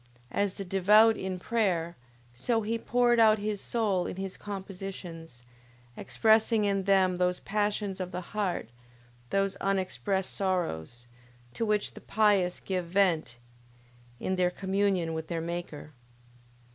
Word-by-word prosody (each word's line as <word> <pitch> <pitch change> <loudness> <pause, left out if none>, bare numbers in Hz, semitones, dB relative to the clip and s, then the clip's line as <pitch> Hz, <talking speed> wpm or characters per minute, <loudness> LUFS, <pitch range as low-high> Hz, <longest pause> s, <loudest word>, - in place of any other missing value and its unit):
As 200 -1 0
the 195 - -5
devout 210 +4 +5
in 190 -2 -4
prayer, 180 -5 0 0.4
so 225 - 0
he 230 +2 -1
poured 240 0 +2
out 220 -1 +6
his 210 -1 -3
soul 205 -6 0
in - - -5
his 190 0 -5
compositions, 185 - -8 0.5
expressing 220 - +3
in 195 -1 0
them 190 -2 +3
those 180 0 +1
passions 205 -1 -1
of 185 -1 -3
the 180 0 -4
heart, 195 - -1 0.6
those 195 0 +1
unexpressed 195 0 -1
sorrows, 120 - -2 0.5
to 230 - -2
which 210 -1 0
the - - -11
pious 200 -4 +2
give 185 -2 -3
vent 170 -8 +1 0.8
in 185 0 -2
their 180 -1 +3
communion 190 -2 0
with 160 0 -4
their 170 - -2
Maker. 165 -2 -6
190 Hz, 135 wpm, -29 LUFS, 180-210 Hz, 0.8 s, out